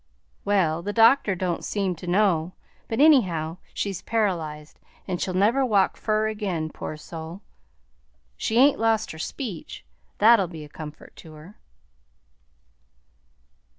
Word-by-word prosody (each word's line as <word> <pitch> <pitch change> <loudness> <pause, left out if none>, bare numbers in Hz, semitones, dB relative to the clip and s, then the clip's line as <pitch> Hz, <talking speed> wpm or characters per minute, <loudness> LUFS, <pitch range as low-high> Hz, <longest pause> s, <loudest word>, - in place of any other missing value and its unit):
"Well, 175 -5 +1
the 205 +4 -4
doctor 225 -2 +5
don't 175 -1 -2
seem 195 -3 -1
to 180 - -10
know; 180 -3 +2 0.3
but 225 - -3
anyhow 180 - +3
she's 195 -3 -3
paralyzed, 165 -9 -2 0.3
and 180 -2 -3
she'll 185 - -2
never 225 +8 +3
walk 205 -6 +2
fur 215 0 0
again, 190 -8 -3
poor 155 - -7
soul! 165 +4 -9 0.9
She 220 - -1
ain't 275 +3 +5
lost 225 -1 +1
her 160 - -10
speech; 200 - -6 0.3
that'll 215 -3 +5
be 160 -3 -9
a - - -15
comfort 150 0 -10
to 160 - -12
her." 155 +7 -14
190 Hz, 130 wpm, -24 LUFS, 160-220 Hz, 0.9 s, doctor